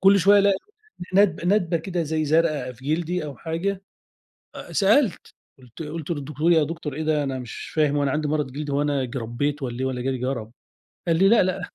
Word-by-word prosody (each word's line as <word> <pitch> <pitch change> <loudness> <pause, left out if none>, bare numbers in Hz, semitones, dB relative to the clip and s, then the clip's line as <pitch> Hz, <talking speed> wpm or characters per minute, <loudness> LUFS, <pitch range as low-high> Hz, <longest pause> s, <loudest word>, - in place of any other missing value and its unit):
كُلّ 195 +1 +6
شوية 200 +3 +6
الاقي 200 -1 +4 0.6
ندب 195 -3 +3
ندبة 180 -4 +2
كده 170 +1 -2
زي 155 0 -1
زرقا 155 -4 +1
في 125 +2 -17
جلدي 175 0 -2
أو 145 -2 -7
حاجة، 185 +4 -3 0.9
سألت 210 +2 +2 0.3
قُلت 125 +4 -11
قُلت 155 +1 -6
للدكتور: 150 +2 0
"يا 160 -2 +4
دكتور 160 -2 -5
إيه 155 - -3
ده 155 -1 +1
أنا 135 -1 -3
مش 125 -2 -7
فاهم 150 -2 +3
هو 145 - +1
أنا 140 - +1
عندي 150 +1 -1
مرض 150 -4 -1
جلدي 145 0 -4
هو 140 +1 +1
أنا 145 -2 0
اجربيت 130 +4 -3
والّا 120 -1 -4
إيه - - 0
والّا 130 -1 -2
جالي 130 -1 -1
جَرَب؟"، 120 -3 -3 0.6
قال 165 - +3
لي: 195 +2 +5
"لأ 230 -4 +6
لأ 185 0 -2
155 Hz, 205 wpm, -24 LUFS, 135-175 Hz, 0.9 s, كُلّ